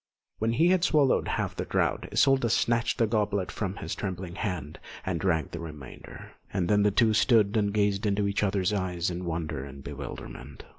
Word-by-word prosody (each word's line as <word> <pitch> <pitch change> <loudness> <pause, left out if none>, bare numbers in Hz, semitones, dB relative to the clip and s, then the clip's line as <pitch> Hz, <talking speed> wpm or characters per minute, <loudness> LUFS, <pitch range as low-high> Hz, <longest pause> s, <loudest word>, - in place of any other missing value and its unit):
When 115 +1 +1
he 165 +8 +4
had 185 -2 +3
swallowed 150 -6 +3
half - - -2
the - - -2
draught, - - 0
Isolda 135 -3 +3
snatched 115 +1 +1
the 115 - +3
goblet 105 -3 0
from 100 -2 -3
his - - -5
trembling 95 -3 -5
hand 90 -6 -4 0.3
and 90 -3 -1
drank 80 -6 0
the 85 - -6
remainder; 75 -5 -10 0.2
and 95 -3 -1
then 105 +2 +3
the 105 - +4
two 110 +2 +3
stood 105 -2 +4
and 105 -2 +2
gazed 100 0 +1
into 100 0 +1
each 100 - 0
other's 100 0 +1
eyes 90 -3 -1
in 90 +1 -5
wonder 80 -5 -3
and 70 0 -10
bewilderment. 70 -1 -8
100 Hz, 190 wpm, -28 LUFS, 85-110 Hz, 0.3 s, he